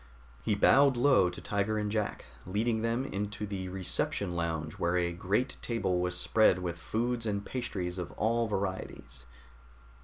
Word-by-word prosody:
He 105 - +1
bowed 135 +5 +5
low 125 -8 +5
to 90 - -8
Tiger 100 +1 0
and 105 -1 -1
Jack, 105 -1 -2 0.2
leading 110 +4 0
them 115 +3 0
into 105 -2 -3
the 95 -2 -4
reception 95 0 -1
lounge 80 -3 -3
where 85 +1 +1
a 85 -1 0
great 100 +9 -1
table 95 -7 0
was 90 0 -1
spread 110 -1 +4
with 85 -2 -4
foods 115 +5 -1
and 100 -1 -2
pastries 95 -8 -3
of 90 -1 -5
all 115 +2 +1
varieties. 95 - -4
100 Hz, 155 wpm, -31 LUFS, 90-115 Hz, 0.2 s, bowed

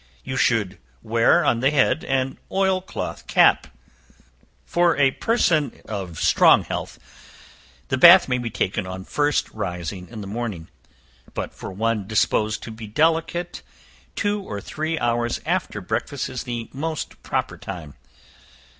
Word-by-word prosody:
You 130 - -5
should 110 -7 +1 0.2
wear 115 +1 +3
on 115 - +2
the 135 +3 +3
head 145 +1 +2
an 130 0 -1
oil 190 -1 +2
cloth 185 - -6
cap. - - +4 1.0
For 175 -1 +2
a 140 -2 +4
person 160 - +1
in 95 -5 -5
strong - - +5
health, - - -5 0.9
the 130 - 0
bath 175 +5 +9
may 125 -1 0
be 120 -1 -3
taken 95 -3 -2
on 95 0 -7
first 145 -1 +1
rising 90 -2 -5
in 110 -3 -8
the - - -7
morning; 100 -5 -5 0.7
but - - -4
for - - -8
one 110 0 -1
disposed 110 0 +1
to 115 - -7
be 110 0 -9
delicate, 165 +7 0 0.5
two 205 0 0
or 105 - -6
three 160 +9 -3
hours 120 -2 0
after - - -1
breakfast 140 -2 -3
is 130 -1 -5
the 120 -2 -4
most 155 +3 -4
proper - - -2
time. 85 -7 -8
120 Hz, 145 wpm, -23 LUFS, 105-155 Hz, 1.0 s, bath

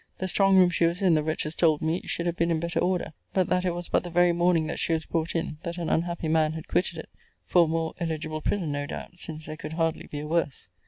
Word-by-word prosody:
The 185 - -2
strong 195 +1 +4
room 180 -1 +6
she 170 - +2
was 175 +4 -2
in, 180 -3 +5
the 155 - +3
wretches 155 0 -2
told 160 -3 +3
me, 160 +3 0
should 170 - -2
have 175 -1 0
been 170 0 +1
in 165 -1 +1
better 170 +1 -1
order, 180 -3 0 0.2
but 185 -3 +2
that 180 0 +1
it 175 -1 0
was 175 0 -4
but - - +1
the 175 - -6
very 175 +1 +4
morning 170 -1 +2
that 160 - -4
she 165 - +1
was 160 0 -1
brought 165 0 -2
in 160 -2 -2
that 170 -1 -5
an 170 -2 -2
unhappy 170 0 0
man 155 -1 +2
had 160 0 -7
quitted 170 -2 0
it; 160 - -8 0.4
for 175 -2 +5
a - - -4
more 160 0 -1
eligible 155 -2 -3
prison, 175 -5 -1
no 145 0 -2
doubt; 175 +3 -8
since 155 -2 -6
there 155 0 -7
could 155 0 -7
hardly 165 -1 -1
be 145 - -6
a - - -6
worse. 160 - -1
165 Hz, 275 wpm, -27 LUFS, 155-175 Hz, 0.4 s, room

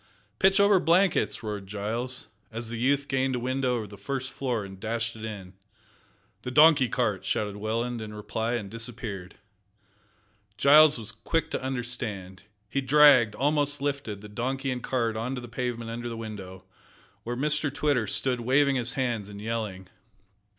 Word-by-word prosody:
"Pitch 195 +1 +5
over 200 -1 +6
blankets!" 175 -3 +2
roared 105 -3 -5
Giles, 110 +5 -3 0.2
as 115 0 -5
the 115 -1 -5
youth 140 +3 +1
gained 130 -1 0
a - - -1
window 130 0 0
of 110 -4 -4
the 100 -1 -12
first 130 +4 -4
floor, 125 -6 -2
and 95 -1 -11
dashed 115 +2 -2
it 110 - -10
in. 100 -4 -7 0.9
"The - - -5
donkey 150 -2 +6
cart!" 110 -6 0
shouted 105 -1 -1
Welland, 115 +3 -2
in 110 -1 -6
reply, 110 +2 -3
and 110 -5 -2
disappeared. 110 -4 -5 1.2
Giles 150 +4 +7
was 115 -1 -7
quick 160 +9 -2
to - - -2
understand. 120 -8 -4 0.3
He 140 +6 -1
dragged 135 -5 +6
almost 145 +1 +1
lifted 140 -8 -3
the 105 - -9
donkey 130 +5 -2
and 125 -1 -3
cart 115 -4 -1
on 120 +4 -3
to 125 - -5
the 120 - -8
pavement 115 -1 -4
under 120 +1 -5
the 115 - -6
window 95 -4 -8 0.6
where 120 +1 -4
Mr 150 +1 +1
Twitter 140 -6 +1
stood 125 +4 +1
waving 135 +3 +3
his 120 -1 0
hands 120 -6 -2
and 100 0 -9
yelling. 105 -4 -4
120 Hz, 165 wpm, -27 LUFS, 110-135 Hz, 1.2 s, Giles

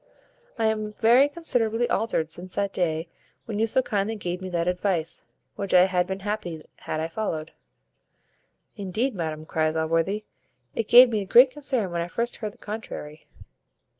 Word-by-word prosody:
I 225 - +1
am 215 -1 0
very 240 +6 +4
considerably 240 -8 0
altered 165 -8 0
since 180 +2 -6
that 200 -1 -1
day 165 -2 -1 0.4
when 215 -2 -4
you 225 - +2
so 260 +4 +2
kindly 210 -1 -1
gave 180 -3 -4
me 185 - -5
that 170 -1 -1
advice, 180 -2 -1 0.3
which 200 -2 -1
I 180 - +8
had 180 -1 +1
been 190 +1 -4
happy 190 -6 -4
had 155 - -4
I 160 - -1
followed." 165 -4 -4 1.2
"Indeed, 210 +7 -1
madam," 160 -4 -4
cries 155 0 0
Allworthy, 165 +6 0 0.5
"it 225 - -2
gave 245 +2 +9
me 215 -3 -1
great 245 +7 +7
concern 260 -9 -1
when 170 0 -1
I 170 - -3
first 235 +6 -2
heard 215 -2 -5
the - - -22
contrary." 185 -8 -7
200 Hz, 165 wpm, -25 LUFS, 170-225 Hz, 1.2 s, gave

